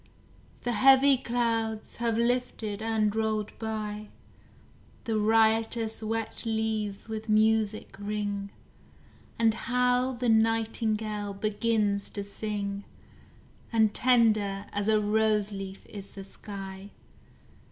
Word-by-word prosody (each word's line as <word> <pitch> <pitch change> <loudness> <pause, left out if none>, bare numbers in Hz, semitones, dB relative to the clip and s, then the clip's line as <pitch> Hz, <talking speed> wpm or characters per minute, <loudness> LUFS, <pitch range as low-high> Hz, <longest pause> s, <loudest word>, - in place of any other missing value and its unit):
The 245 - 0
heavy 270 +4 +6
clouds 230 -3 -2
have 230 -1 0
lifted 235 -3 -1
and 220 -2 +1
rolled 215 -1 -1
by; 215 -1 -4 1.0
The 225 - -1
riotous 225 +1 +2
wet 225 0 -3
leaves 220 -3 -2
with 220 0 -6
music 215 -1 +2
ring, 205 -1 -3 0.9
And 225 -1 +3
now 250 +1 +2
the 245 0 -2
nightingale 220 -2 +1
begins 210 -1 0
to 200 - -3
sing, 200 -1 -4 0.9
And 220 -2 +3
tender 215 -5 +3
as 205 0 -1
a 215 -1 +4
rose 210 0 +2
leaf 195 -1 -7
is 200 -2 -9
the 195 - -9
sky. 195 0 -9
220 Hz, 105 wpm, -28 LUFS, 205-225 Hz, 1.0 s, heavy